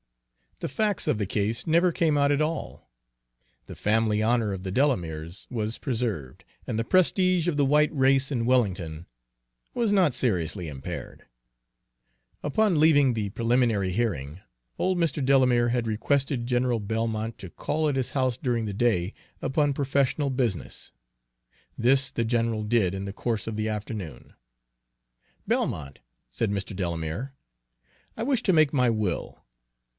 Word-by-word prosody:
The - - -2
facts 210 +6 -1
of - - +2
the 105 - 0
case 110 +4 -1
never 170 +3 +4
came 160 -2 +1
out 140 0 +3
at 145 +1 +2
all. 155 - -4 0.8
The - - -8
family 110 0 +1
honor 115 -1 +2
of 95 -1 -4
the 95 0 -5
Delameres 85 - -1
was 110 -2 -3
preserved, 110 - -3 0.2
and 110 - -2
the 115 - +1
prestige 185 - +3
of 165 -4 0
the 145 - +3
white 150 +3 +3
race 135 +1 +3
in 120 -4 0
Wellington 90 -10 0 0.7
was 230 -3 +1
not 185 -9 +4
seriously 95 -8 -1
impaired. 70 -3 -7 1.2
Upon 180 +3 +2
leaving 145 -4 +5
the 105 -3 -2
preliminary 115 -3 +1
hearing, 90 - -2 0.4
old 185 0 +1
Mr. 160 -4 0
Delamere 130 -3 +4
had 120 -1 0
requested 130 +3 0
General 125 -1 +1
Belmont 110 +1 -2
to 95 - -8
call 155 - -1
at 145 - 0
his 130 -2 -1
house 130 -3 0
during 120 -4 -1
the 105 - -4
day 100 -4 +1 0.3
upon 145 0 +1
professional 140 +1 0
business. 120 - -3 0.8
This 130 +3 +2
the 115 - -1
general 115 -2 0
did 105 -4 +1
in 95 0 -4
the 100 - -5
course 115 0 -2
of 110 - -3
the 110 0 -1
afternoon. 105 - -6 1.1
"Belmont," 70 -3 -1 0.3
said 110 -3 -1
Mr. 100 0 -3
Delamere, 85 - -3 0.8
"I - - -4
wish 255 0 +1
to 190 - +3
make 155 -3 +4
my 125 -3 +3
will. 105 -6 -2
120 Hz, 150 wpm, -26 LUFS, 105-140 Hz, 1.2 s, leaving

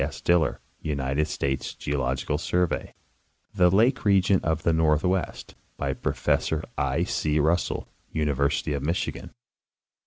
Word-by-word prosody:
S. 70 - -4
Diller, 85 -2 +2 0.2
United 70 0 -1
States 65 -3 -2
Geological 70 +1 -1
Survey; 90 +1 -1 0.6
The 90 -1 +4
lake 115 +8 +3
region 100 -2 +4
of 80 0 -1
the 85 - +3
northwest, 80 +4 0 0.2
by 70 -1 -1
Professor 80 +3 0
I. 70 +5 0
C. 75 -4 0
Russell, 80 +4 +1 0.2
University 75 -1 0
of 70 - -2
Michigan. 80 +5 -2
80 Hz, 120 wpm, -26 LUFS, 70-90 Hz, 0.6 s, The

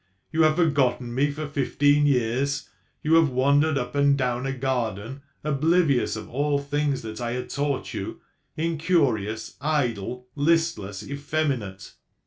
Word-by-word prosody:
You 160 +1 +1
have 155 -1 +5
forgotten 135 -7 +1
me 140 +4 +2
for 150 +2 -4
fifteen 145 +1 +2
years; 135 +2 0 0.4
you 155 - +2
have 165 -2 +6
wandered 140 +4 +3
up 125 -2 -3
and 140 -1 +3
down 125 0 -1
a - - -1
garden, 125 -2 -2 0.2
oblivious 150 -2 +2
of 110 -1 -7
all 145 +4 0
things 140 -1 -1
that 110 +1 -6
I 120 0 -2
had 125 0 -5
taught 140 -1 -2
you, - - -5 0.4
incurious, 150 - 0
idle, 125 -5 -1
listless, 145 - 0
effeminate. 140 -9 -3
140 Hz, 135 wpm, -25 LUFS, 125-150 Hz, 0.4 s, have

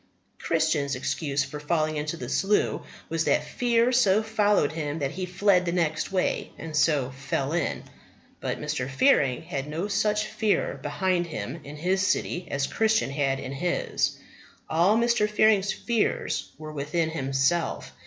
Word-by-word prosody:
Christian's 140 -2 +1
excuse 140 +2 -1
for 145 +1 -7
falling 155 +1 0
into 150 +2 -3
the - - -6
Slough 205 +2 +1 0.3
was - - -1
that - - +2
fear 240 0 +1
so 220 -4 +4
followed 210 -8 +2
him 155 -1 -3
that 140 -3 -2
he 185 +2 -4
fled 185 0 +3
the 175 - -1
next 165 -1 0
way, 185 -1 0
and 160 -1 -7
so 150 -4 +2
fell 135 +1 -3
in. 170 -4 -1 0.6
But - - -3
Mr. 150 -4 -3
Fearing 135 - +3
had 145 -5 -4
no 165 +6 -3
such 210 +1 +1
fear 215 -1 0
behind 185 -2 0
him 120 +3 -5
in 145 +1 -9
his 185 +5 +1
city 185 -2 0
as 140 0 0
Christian 220 -2 +1
had 135 -1 0
in 130 - -6
his. 175 +6 -1 0.5
All 175 +7 +3
Mr. 235 -2 +2
Fearing's 210 -2 +3
fears 235 -3 -1
were 155 0 -8
within 155 +3 -1
himself. 140 +3 0
165 Hz, 155 wpm, -26 LUFS, 145-200 Hz, 0.6 s, so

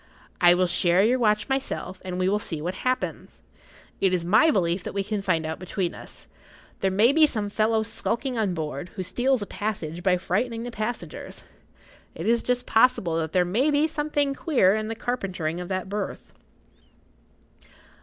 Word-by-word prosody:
I 175 0 +7
will 185 +1 +2
share 175 +1 +4
your 250 +4 +3
watch 210 -2 +2
myself, 265 -8 -3
and 180 -1 -4
we 185 0 +1
will 205 +2 +2
see 165 -6 -4
what 175 +4 -3
happens. 255 +6 -3 0.6
It 190 -1 +2
is 175 -2 0
my 220 - +5
belief 180 - +1
that - - -6
we 200 - 0
can 205 0 -3
find 170 -5 0
out 160 0 -4
between 185 -1 -3
us. - - -12 0.5
There 195 - +1
may 210 +6 +4
be 310 +1 +5
some 210 -7 -3
fellow 220 +1 +1
skulking 240 +4 -3
on 210 -6 0
board, 155 +1 -4
who 190 - -3
steals 245 +5 +1
a - - -5
passage 175 -6 -4
by 180 0 +3
frightening 225 +6 -2
the 245 - -5
passengers. 215 -7 -5 0.7
It 165 - -6
is 230 +1 +3
just 250 0 -1
possible 220 -8 +3
that 160 -1 -2
there 180 -1 +3
may 230 +12 +1
be 295 +1 +3
something 295 -2 -1
queer 265 - +3
in 215 0 -2
the 225 - -4
carpentering 185 -9 -3
of 180 - -6
that 185 0 -3
berth." 200 0 -5
205 Hz, 185 wpm, -25 LUFS, 180-240 Hz, 0.7 s, I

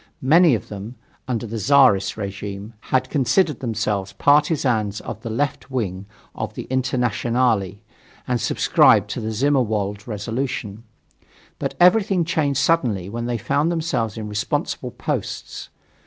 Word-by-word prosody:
Many 160 +1 +5
of 105 - -6
them, 105 +4 -7 0.3
under 120 -3 -2
the 115 0 -5
Czarist 125 -6 +4
regime, 100 +1 -6 0.2
had 130 0 +1
considered 150 +2 +2
themselves 105 -5 -2
partisans 130 - +2
of 110 - -7
the 115 - -5
left 140 +5 -2
wing 100 -7 -3 0.3
of - - -5
the - - -5
Internationale, 120 -5 +1 0.5
and 125 -3 0
subscribed - - +4
to - - -4
the 110 - -3
Zimmerwald 110 -5 0
resolution. 110 -1 -4 0.8
But - - -3
everything 185 -1 +4
changed 150 -5 0
suddenly 115 - +1
when 120 +2 -4
they 120 -1 -1
found 145 +9 0
themselves 135 - -1
in 110 -1 -5
responsible 105 0 -2
"posts." - - -5
120 Hz, 130 wpm, -22 LUFS, 105-140 Hz, 0.8 s, Many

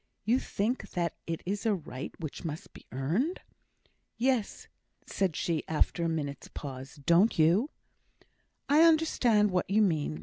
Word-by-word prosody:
"You 240 +4 +3
think 230 +3 -2
that 170 -2 -1
it 165 -1 -4
is 200 +2 -2
a 220 -3 +2
right 145 -6 -7
which 155 +1 -6
must 160 -2 -6
be - - -15
earned?" 175 - -1 0.8
"Yes," 245 -2 0 0.4
said 190 -5 -1
she, 165 -3 -1
after 160 +2 0
a 165 - +1
minute's 145 -3 -4
pause. 135 -1 -8
"Don't 170 +9 +3
you?" 175 - +4 1.0
"I 295 +2 +5
understand 270 -11 +4
what 180 0 0
you 215 +2 +4
mean. 150 - 0
180 Hz, 145 wpm, -30 LUFS, 155-225 Hz, 1.0 s, I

